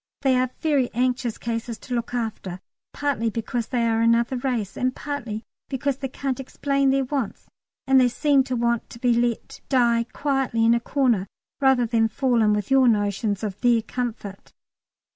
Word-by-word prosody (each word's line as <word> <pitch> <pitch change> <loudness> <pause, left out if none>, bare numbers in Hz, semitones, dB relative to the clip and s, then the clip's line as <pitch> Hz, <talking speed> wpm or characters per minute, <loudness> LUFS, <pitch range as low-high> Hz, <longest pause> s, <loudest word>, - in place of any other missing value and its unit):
They 265 -2 +4
are 255 0 +1
very 285 -6 +1
anxious 245 -1 0
cases 230 0 -4
to 255 - -8
look 235 -1 -2
after, 215 -6 -4 0.3
partly 280 -6 -1
because 230 +1 -3
they 240 -2 0
are 225 0 +1
another 230 +2 +3
race 245 -6 -2
and 255 0 -1
partly 240 -7 -5 0.3
because 275 0 -1
they 270 - -3
can't 265 0 -3
explain 275 +1 0
their 270 0 +2
wants, 260 -4 -3 0.4
and 265 -1 +5
they 250 - +5
seem 275 +2 +2
to 255 - -2
want 235 -1 0
to - - -10
be 245 0 +2
let 235 -1 -1
die 235 -3 +3
quietly 270 -5 0
in 230 - +5
a 235 - +2
corner 235 -6 +1 0.3
rather 265 -3 +4
than 225 -1 +2
fall 245 +1 +1
in 210 -1 +4
with 210 +2 -1
your 265 -1 +5
notions 205 -1 0
of 205 -3 -4
their 235 -2 +3
comfort. 225 -5 -5
240 Hz, 180 wpm, -24 LUFS, 230-265 Hz, 0.4 s, and